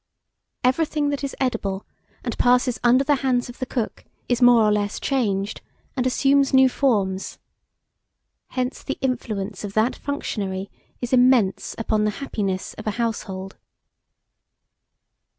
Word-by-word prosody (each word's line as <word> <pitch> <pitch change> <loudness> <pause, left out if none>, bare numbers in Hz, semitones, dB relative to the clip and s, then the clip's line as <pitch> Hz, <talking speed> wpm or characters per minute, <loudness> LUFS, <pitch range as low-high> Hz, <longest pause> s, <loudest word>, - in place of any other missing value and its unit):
Everything 290 +2 +1
that 285 0 -3
is 275 - -3
edible, 205 -7 -1 0.4
and - - -3
passes 250 0 +3
under 245 +2 +5
the 285 0 +2
hands 250 -2 0
of 245 - -11
the 255 - -3
cook, 240 -4 -3 0.2
is 245 0 0
more 245 -2 +7
or 210 - +4
less 205 -1 0
changed, 210 -7 -1 0.3
and 255 -2 +1
assumes 275 +1 +3
new 265 0 +7
forms. 205 -8 0 1.1
Hence 255 0 -3
the 275 - -4
influence 215 -6 -3
of 200 -1 -5
that 220 +4 +2
functionary 195 -9 -4 0.3
is 245 +1 -3
immense 250 -6 +3
upon 215 -1 0
the - - +2
happiness 195 -8 -3
of 215 - -7
a - - +2
household. 195 -5 -3
245 Hz, 135 wpm, -23 LUFS, 205-260 Hz, 1.1 s, more